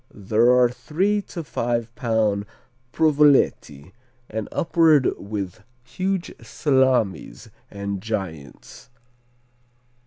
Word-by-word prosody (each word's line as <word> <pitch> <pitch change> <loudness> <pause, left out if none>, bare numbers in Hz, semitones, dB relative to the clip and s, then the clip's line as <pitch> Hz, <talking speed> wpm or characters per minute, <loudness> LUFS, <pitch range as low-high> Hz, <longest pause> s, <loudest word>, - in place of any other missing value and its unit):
There 110 +4 +1
are 125 -1 +5
three 190 +11 -1
to 170 - -6
five 120 -4 -3
pound 110 -5 0 0.4
Provoletti, 140 - +2 0.4
and 110 -1 -4
upward 160 -5 +3
with 100 -3 -6 0.2
huge 185 +6 -3
Salamis 130 -4 0 0.2
and 100 -1 -5
Giants. 95 - -7
115 Hz, 85 wpm, -22 LUFS, 100-150 Hz, 0.4 s, are